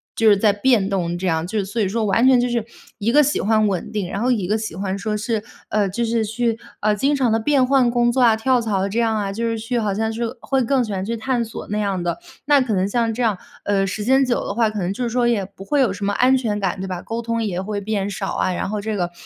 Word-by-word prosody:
就 225 -1 +4
是 205 - +5
再 210 0 +4
变 205 -2 +2
动 175 -3 -1
这 190 - -2
样。 160 0 0
就 210 +3 -2
是 195 - -1
所 215 +4 -4
以 195 - +2
说 225 +2 -1
完 220 +5 +3
全 255 -2 +6
就 245 - +1
是 235 -2 -1 0.4
一 220 +3 +1
个 295 +3 +6
喜 295 +1 +1
欢 215 +1 +2
稳 190 -3 -2
定， 200 -4 -3
然 200 - -3
后 250 +1 +2
一 200 -7 0
个 215 +2 +1
喜 215 -6 -5
欢 195 0 -3
说 210 +1 -2
是， 215 0 -2 0.2
呃， 205 -2 +1
就 235 +5 -1
是 230 -1 0
去， 225 +1 -1 0.2
呃， 210 0 +2
经 275 +8 +1
常 260 -4 +2
地 - - +3
变 265 +2 +3
换 260 -3 +3
工 240 0 +2
作 255 +2 +1
啊， 230 -2 +6
跳 250 +2 +2
槽 200 -3 0
这 220 +4 -2
样 225 -1 +2
啊， 200 -1 -2
就 230 +3 -4
是 225 -1 -1
去 235 +2 -2
好 210 -3 0
像 220 +2 -1
是 235 +1 -3 0.2
会 265 -2 0
更 265 +2 +2
喜 210 - -5
欢 190 0 -2
去 230 +3 -3
探 240 +1 -1
索 225 - -8
那 210 - -1
样 195 -3 -1
的。 175 0 -2 0.3
那 285 -2 +5
可 235 -4 -1
能 190 0 +1
像 230 +1 0
这 245 - -4
样， 215 -5 +1 0.3
呃， 195 -1 +2
时 205 +2 -4
间 265 +2 +4
久 250 -2 0
的 - - -2
话， 230 -2 +3
可 215 -1 -4
能 185 +1 -1
就 250 - -4
是 235 - -1
说 240 0 +1
也 220 -5 +1
不 195 0 -11
会 285 +3 +2
有 230 -7 +3
什 200 0 -4
么 205 - 0
安 260 +3 +4
全 210 -5 -2
感， 185 -1 -1
对 190 - -4
吧？ 180 -2 -4
沟 230 +1 -4
通 230 0 -2
也 185 -3 -2
会 205 +1 -4
变 205 -1 -2
少 195 -1 -4
啊， 185 - 0
然 185 - -3
后 210 -1 -2
这 215 +1 -3
个， 175 -2 -2
220 Hz, 320 characters per minute, -21 LUFS, 200-240 Hz, 0.4 s, 全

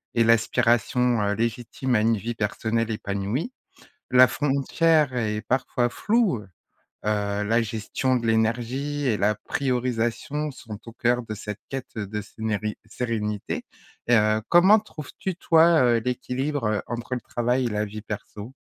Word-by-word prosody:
et 115 - +4
l'aspiration, 115 +1 +2
heu, 100 0 +1
légitime 120 +3 -2
à 105 - +3
une 115 0 +2
vie 115 +4 -4
personnelle 110 +2 -1
épanouie. 105 - -3 0.6
La 125 0 +8
frontière 145 +1 +2
est 105 -2 -1
parfois 120 0 0
floue, 215 - +1
heu 100 - -15 0.6
heu, 105 -1 0
la 115 +3 +2
gestion 115 +4 -1
de 115 -2 -1
l'énergie 120 +6 0
et 110 - +2
la 105 +1 +2
priorisation 125 +5 -2
sont 110 -5 -9
au - - -7
cœur 120 0 +1
de 110 - -4
cette 105 0 -6
quête 135 -2 -6
de 105 0 -3
sénéri 110 0 -3
sérénité 105 -3 -3 0.4
et 120 - +3
heu, 110 0 +3
comment 190 +5 +7
trouves-tu 185 -1 -6
toi, 165 -2 +5
heu, 120 -1 +4
l'équilibre 125 -1 -2
entre 120 +2 -4
le 125 - -4
travail 125 +3 0
et - - 0
la 105 0 -1
vie 105 +1 -7
perso? 105 +2 -7
120 Hz, 150 wpm, -25 LUFS, 110-130 Hz, 0.6 s, La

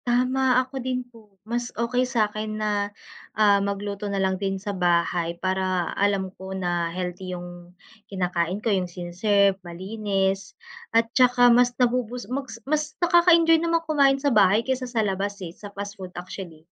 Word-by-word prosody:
Tama, 255 +1 +2
ako 265 0 -6
din 255 0 -2
po, 220 -5 -20
mas 240 +2 -2
okey 250 +2 0
sa 230 -4 +2
akin 215 +1 -5
na, 205 -1 -1 0.5
ah, 205 -2 +5
magluto 200 +1 -3
na 200 - -2
lang 190 0 0
din 195 -1 -1
sa 200 +1 -5
bahay 170 -1 +1
para 185 -1 -1
alam 195 -2 0
ko 190 0 -5
na 175 -2 -1
healthy 180 +1 -5
yung 175 0 -11 0.3
kinakain 180 -1 -1
ko, 220 - +2
yung 185 -2 0
sine-serve, 195 +3 +1
malinis, 195 +2 -2 0.3
at 230 0 +1
tsaka 245 -1 +5
mas 245 0 +3
nabo-boost, 250 0 -1
mas 260 -4 -4
mas 305 +2 +1
nakaka-enjoy 340 -2 +5
naman 335 0 +1
kumain 280 -4 +3
sa 280 -1 0
bahay 210 +1 +4
kaysa 255 -1 -2
sa 225 -3 0
labas, 200 +1 -2
eh, 165 - -8
sa 205 +3 -10
fast 200 0 -6
food 185 - -6
actually. 175 -3 -8
205 Hz, 165 wpm, -24 LUFS, 185-245 Hz, 0.5 s, ah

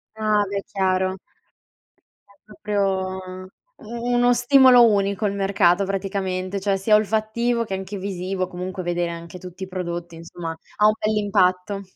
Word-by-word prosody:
Ah, 215 -1 +1
beh, 200 0 -2
chiaro. 190 -1 0 1.2
È - - -39
proprio 190 -3 -3 0.3
u 235 +2 -4
uno 245 0 +4
stimolo 245 0 +6
unico 200 0 0
il 200 - 0
mercato, 195 -1 +2
praticamente, 195 -1 -3
cioè 195 0 0
sia 210 +2 +3
olfattivo 220 +3 0
che 195 - -6
anche 190 +1 -5
visivo, 185 -1 -3
comunque 185 +1 -6
vedere 175 0 -1
anche 170 +1 -9
tutti 180 +1 -9
i - - -5
prodotti, 175 -2 -5
insomma, 165 0 -7 0.2
ha 210 - +3
un 215 - +6
bell'impatto. 200 -2 +1
195 Hz, 140 wpm, -22 LUFS, 185-210 Hz, 1.2 s, stimolo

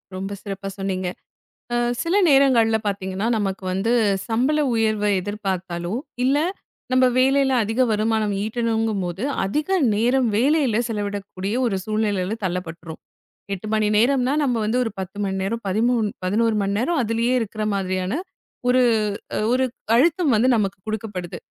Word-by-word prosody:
ரொம்ப 195 +1 -4
சிறப்பா 195 -1 -6
சொன்னீங்க. 190 -1 -2 0.7
அ - - +2 0.3
சில 335 +3 0
நேரங்கள்ல 255 -5 +4
பாத்தீங்கன்னா 195 +1 -2
நமக்கு 195 -2 -2
வந்து 195 +5 0 0.4
சம்பள 255 +7 +1 0.2
உயர்வை 215 -2 +1
எதிர்பார்த்தாலும் 190 -1 -3 0.2
இல்ல 270 +3 +3 0.5
நம்ம 255 0 +5
வேலையில 270 +1 +3
அதிக 225 +4 0
வருமானம் 215 -1 +1
ஈட்டணும்ங்கும்போது 220 -4 -1 0.2
அதிக 255 +11 -1 0.3
நேரம் 245 +4 +2
வேலையில 265 -2 +2
செலவிடக்கூடிய 205 -2 -4
ஒரு 220 -5 0
சூழ்நிலையில 210 -3 -1
தள்ளப்பட்டுரும். 170 -3 -4 0.5
8 195 +2 -6
மணி 215 -1 +2
நேரம்னா 255 +3 +3
நம்ம 255 -4 +1
வந்து 220 +4 0
ஒரு 225 - -3
10 190 +1 -6
மணி 195 -1 -2
நேரம் 230 +4 -3
13 220 +2 +1 0.2
11 220 +4 +2
மணி 200 0 -1
நேரம் 295 +7 0
அதுலயே 230 +2 0
இருக்கிற 215 0 -4
மாதிரியான 185 0 -2 0.6
ஒரு 255 +1 +4 0.7
ஒரு 260 +1 +2 0.3
அழுத்தம் 315 +1 +3
வந்து 225 +4 +3
நமக்குக் 195 -3 -2
கொடுக்கப்படுது. 205 -5 -4
215 Hz, 130 wpm, -22 LUFS, 195-240 Hz, 0.7 s, நம்ம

